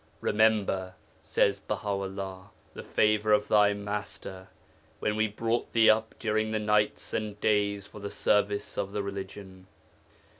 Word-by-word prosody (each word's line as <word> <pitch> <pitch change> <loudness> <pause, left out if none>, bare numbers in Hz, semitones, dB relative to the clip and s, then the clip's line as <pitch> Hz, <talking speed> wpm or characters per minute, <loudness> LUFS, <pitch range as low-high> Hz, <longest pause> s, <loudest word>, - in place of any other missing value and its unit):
'Remember,' 100 -4 +1 0.3
says 100 0 +2
Baha 105 0 -4
'ullah, 95 -1 -4 0.2
'the - - -7
favour 105 0 +2
of 105 0 +3
thy 105 -1 +4
master, 100 -2 -6 0.5
when 105 - 0
we 110 0 +2
brought 115 +3 -2
thee 115 -1 +7
up 110 +1 -1
during 110 -1 0
the 110 - -1
nights 105 0 0
and 105 -1 -3
days 100 -2 +1
for 105 - -12
the 100 0 -5
service 105 0 0
of 100 0 -3
the 100 - -1
Religion. 95 -1 -8
105 Hz, 145 wpm, -28 LUFS, 100-110 Hz, 0.5 s, thee